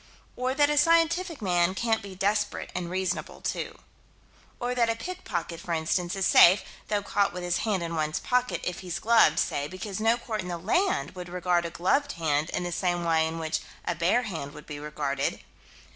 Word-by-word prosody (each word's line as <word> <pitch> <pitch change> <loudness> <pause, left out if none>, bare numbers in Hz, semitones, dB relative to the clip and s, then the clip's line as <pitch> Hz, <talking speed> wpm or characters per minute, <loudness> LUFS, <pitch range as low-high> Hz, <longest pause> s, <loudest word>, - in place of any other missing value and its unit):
Or 255 +1 -1
that 290 +1 +4
a 295 - +4
scientific 330 - +2
man 175 -1 +2
can't 225 +2 +1
be 200 -2 -9
desperate 205 +2 -1
and 180 -1 -3
reasonable 185 0 -2
too. - - -4 0.8
Or 245 +1 -1
that 235 -2 +2
a 230 - +1
pickpocket, 220 - -5
for 170 -1 -4
instance, 175 +3 -1
is 195 -1 0
safe, 185 +2 +7 0.2
though 205 -1 0
caught 200 -1 +1
with 180 0 -5
his 175 0 0
hand 200 -5 0
in 170 0 -4
one's 155 -1 -1
pocket, 250 0 0
if 180 0 -3
he's 180 -2 -4
gloved, 225 -9 +4
say: 145 0 0
because 185 +3 -6
no 225 +2 +3
court 225 -2 -4
in 180 - -7
the 175 -1 -3
land 360 - +1
would 180 -1 -8
regard 175 -1 +1
a - - -6
gloved 275 - +1
hand 155 -1 0
in - - -2
the 175 - -3
same 175 0 0
way 160 -1 +3
in 160 +1 -4
which 160 -1 -1 0.3
a - - 0
bare 175 +9 +2
hand 160 -10 -5
would 150 - -11
be 145 -1 -7
regarded. 145 -2 -2
180 Hz, 205 wpm, -27 LUFS, 170-225 Hz, 0.8 s, safe